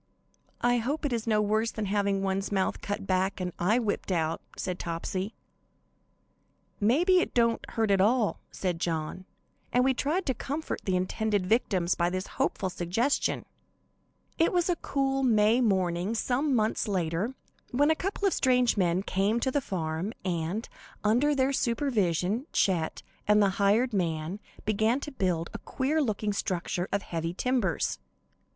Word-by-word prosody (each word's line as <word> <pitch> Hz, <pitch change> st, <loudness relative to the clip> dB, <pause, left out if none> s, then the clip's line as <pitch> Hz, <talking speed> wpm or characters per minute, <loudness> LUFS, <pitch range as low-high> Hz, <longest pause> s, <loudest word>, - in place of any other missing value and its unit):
"I 245 Hz, 0 st, +3 dB
hope 285 Hz, +7 st, -2 dB
it 275 Hz, -, 0 dB
is 230 Hz, -1 st, -2 dB
no 215 Hz, -1 st, +3 dB
worse 215 Hz, +2 st, +1 dB
than 215 Hz, -1 st, -4 dB
having 200 Hz, -1 st, 0 dB
one's 195 Hz, +1 st, -1 dB
mouth 195 Hz, -2 st, 0 dB
cut 205 Hz, 0 st, -4 dB
back 190 Hz, +1 st, 0 dB
and 180 Hz, -1 st, -3 dB
eye 205 Hz, +7 st, +3 dB
whipped 215 Hz, -4 st, -1 dB
out," 165 Hz, -2 st, 0 dB, 0.2 s
said 180 Hz, -1 st, -3 dB
Topsy. 185 Hz, +5 st, -3 dB, 1.4 s
"May 240 Hz, +11 st, +3 dB
be 370 Hz, 0 st, +5 dB
it -, -, -3 dB
don't 230 Hz, -1 st, +2 dB
hurt 225 Hz, -3 st, 0 dB
at 195 Hz, -1 st, +4 dB
all," 220 Hz, +1 st, +2 dB
said 180 Hz, -3 st, -3 dB
John, 165 Hz, +2 st, -3 dB, 0.5 s
and 250 Hz, -, +3 dB
we 265 Hz, -, +4 dB
all -, -, -3 dB
tried 320 Hz, +9 st, 0 dB
to 260 Hz, -, +1 dB
comfort 290 Hz, +6 st, -4 dB
the 190 Hz, -, +1 dB
intended 200 Hz, +2 st, 0 dB
victims 185 Hz, -4 st, +2 dB
by 175 Hz, 0 st, +1 dB
this 185 Hz, +1 st, -3 dB, 0.2 s
hopeful 190 Hz, -1 st, 0 dB
suggestion. 190 Hz, +12 st, 0 dB, 0.9 s
It 330 Hz, -, +4 dB
was 355 Hz, 0 st, +2 dB
a -, -, +1 dB
cool, 270 Hz, -2 st, 0 dB
May 225 Hz, -1 st, +4 dB
morning, 190 Hz, -2 st, +1 dB
some 265 Hz, +4 st, +1 dB
months 220 Hz, 0 st, +1 dB
later, 185 Hz, +5 st, -1 dB, 0.3 s
when 290 Hz, +5 st, +3 dB
a -, -, +3 dB
couple 395 Hz, +3 st, -1 dB
of 385 Hz, -, +1 dB
strange 250 Hz, -2 st, +3 dB
men 180 Hz, 0 st, +2 dB
came 200 Hz, +4 st, +1 dB
to 260 Hz, +2 st, 0 dB
the 285 Hz, -, +1 dB
farm, 170 Hz, -1 st, -3 dB
and, 175 Hz, +5 st, -2 dB, 0.4 s
under 245 Hz, +8 st, +3 dB
their 270 Hz, 0 st, +2 dB
supervision, 230 Hz, -, 0 dB
Chet 170 Hz, -5 st, 0 dB, 0.2 s
and 210 Hz, 0 st, +5 dB
the 200 Hz, -1 st, +4 dB
hired 220 Hz, +5 st, +3 dB
man 170 Hz, 0 st, -1 dB, 0.3 s
began 220 Hz, +4 st, +2 dB
to 295 Hz, -, -6 dB
build 180 Hz, -, -1 dB
a -, -, -5 dB
queer 295 Hz, +4 st, 0 dB
looking 215 Hz, -5 st, -1 dB
structure 180 Hz, -1 st, -2 dB
of 200 Hz, 0 st, 0 dB
heavy 165 Hz, 0 st, -3 dB
timbers. 240 Hz, -, 0 dB
210 Hz, 165 wpm, -28 LUFS, 185-250 Hz, 1.4 s, be